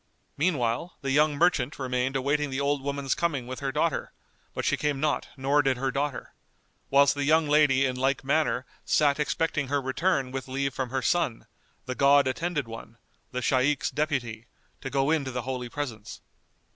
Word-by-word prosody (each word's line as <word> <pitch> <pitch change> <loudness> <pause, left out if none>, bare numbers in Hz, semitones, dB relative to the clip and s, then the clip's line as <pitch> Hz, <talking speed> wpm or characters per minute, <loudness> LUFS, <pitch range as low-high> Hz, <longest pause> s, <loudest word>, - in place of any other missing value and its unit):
Meanwhile, 145 -1 -1
the 135 -1 -2
young 150 +1 +3
merchant 150 -4 +2
remained 130 0 -1
awaiting 145 +2 0
the 130 0 -3
old 140 0 0
woman's 140 -1 -1
coming 145 -8 -1
with 130 +1 -6
her 135 -1 -2
daughter, - - -1 0.4
but - - -3
she - - +2
came 150 -2 -1
not 150 0 0
nor 140 +2 +3
did 135 -2 +1
her 135 +1 -1
daughter; 140 -1 -3 0.6
whilst 140 0 +5
the 145 - -2
young 155 +2 +3
lady 145 -2 +4
in 130 -1 -1
like 135 +2 0
manner 135 -3 +1 0.2
sat 145 -1 +2
expecting 150 -1 0
her 145 +2 +1
return 135 0 0
with 135 0 -5
leave 135 +1 -2
from 130 0 -3
her 130 +1 -2
son, 170 -10 0 0.4
the 130 - -3
God 140 +1 +4
attended 150 0 -2
one, 115 0 -10 0.3
the 125 0 -3
Shaykh's 135 +3 +1
deputy, 125 -7 -2 0.3
to 135 - -4
go 135 +2 +1
in 160 -3 +2
to 130 - -4
the 125 -1 -3
holy 125 -1 -4
presence. 120 -7 -6
135 Hz, 185 wpm, -27 LUFS, 130-145 Hz, 0.6 s, whilst